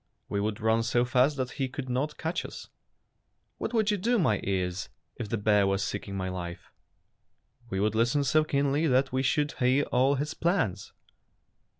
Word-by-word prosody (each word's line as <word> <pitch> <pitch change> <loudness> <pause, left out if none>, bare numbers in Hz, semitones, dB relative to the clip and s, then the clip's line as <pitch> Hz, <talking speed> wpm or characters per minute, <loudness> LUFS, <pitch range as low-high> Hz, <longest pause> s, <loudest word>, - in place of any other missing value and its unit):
''We 100 - 0
would 105 0 -2
run 110 +1 +2
so 120 +1 +1
fast 130 +4 +2
that 130 -1 -2
he 135 - 0
could 130 0 -6
not 130 +5 -2
catch 165 +3 -2
you." - - -6 1.1
"What - - -3
would 220 -3 +2
you 205 - +1
do, 235 +6 +1
my 130 - +2
ears, 90 -1 -2 0.3
if 110 -4 -5
the 115 - 0
bear 105 -1 +3
was 95 0 +1
seeking 100 -1 -4
my 95 -1 -2
life?" 85 -2 -6 0.5
" 120 -1 -33
We 95 - -2
would 105 +1 +1
listen 120 +6 +2
so 155 +3 +3
keenly 145 +1 +1
that 130 -1 +2
we 130 - +1
should 145 +2 +1
hear 130 +3 +3
all 130 +3 +3
his 145 +2 -2
plans." 165 - -1
125 Hz, 190 wpm, -28 LUFS, 105-145 Hz, 1.1 s, bear